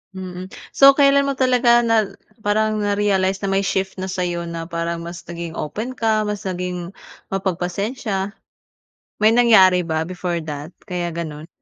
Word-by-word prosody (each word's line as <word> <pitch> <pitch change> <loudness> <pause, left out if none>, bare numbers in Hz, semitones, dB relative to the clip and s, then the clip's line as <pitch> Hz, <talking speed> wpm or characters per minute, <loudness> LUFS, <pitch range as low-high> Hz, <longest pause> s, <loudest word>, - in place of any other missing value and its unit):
Mm. 185 0 -7 0.2
So, 275 0 +7
kailan 280 0 +4
mo 275 - -2
talaga 245 -2 +4
na 220 -3 +2 0.3
parang 215 +1 +1
na-realize 200 -2 +1
na - - -1
may 195 - +2
shift 190 -1 -2
na 190 - -3
sa'yo 180 -2 -2
na 165 0 -5
parang 170 0 -3
mas 170 0 -7
naging 170 -1 -6
open 215 +12 -4
ka, 220 -3 +1
mas 210 -1 -3
naging 180 -1 -4 0.4
mapagpasensya. 195 +3 -2 0.8
May 215 +1 +4
nangyari 205 -7 +6
ba 160 -2 -1
before 180 0 -3
that 150 0 -6 0.2
kaya 180 -3 -3
gano'n? 160 -2 -6
190 Hz, 150 wpm, -21 LUFS, 175-215 Hz, 0.8 s, So